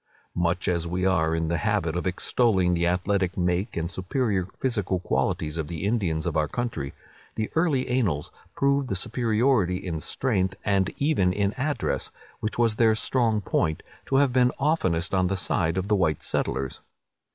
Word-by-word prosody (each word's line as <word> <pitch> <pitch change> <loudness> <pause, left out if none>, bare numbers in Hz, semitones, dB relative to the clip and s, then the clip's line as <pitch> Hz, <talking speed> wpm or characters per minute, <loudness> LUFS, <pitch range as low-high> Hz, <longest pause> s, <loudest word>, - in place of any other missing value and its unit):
Much 85 +1 0
as 85 -2 0
we 90 +2 -1
are 80 -4 +2
in 80 0 -1
the 85 +1 0
habit 80 +1 0
of 90 +2 -1
extolling 95 -1 +2
the 85 0 +1
athletic 95 +1 0
make 90 +4 0
and 85 +1 -2
superior 95 0 -1
physical 105 -8 0
qualities 75 +2 -1
of 80 - -2
the 80 -1 -5
Indians 95 -8 0
of - - -2
our 75 -1 +2
country, 115 - -4 0.4
the 110 - -2
early 155 -6 +1
annals 105 - 0 0.2
prove 140 0 +2
the 95 - -2
superiority 115 -2 +1
in 90 -4 -4
strength, 95 - -1
and 100 -2 +2
even 140 -11 +2
in 100 +2 0
address, 145 +3 -2 0.3
which 110 - -3
was 115 -2 +2
their 110 -2 +4
strong 110 -2 +1
point, 80 -4 0 0.2
to 135 - 0
have 135 -2 +4
been 125 -1 +4
oftenest 95 - +1
on 95 -1 +3
the 95 +1 -1
side 85 -3 0
of 95 +1 -1
the 105 - +3
white 80 -6 +1
settlers. 65 0 -2
95 Hz, 175 wpm, -26 LUFS, 85-120 Hz, 0.4 s, their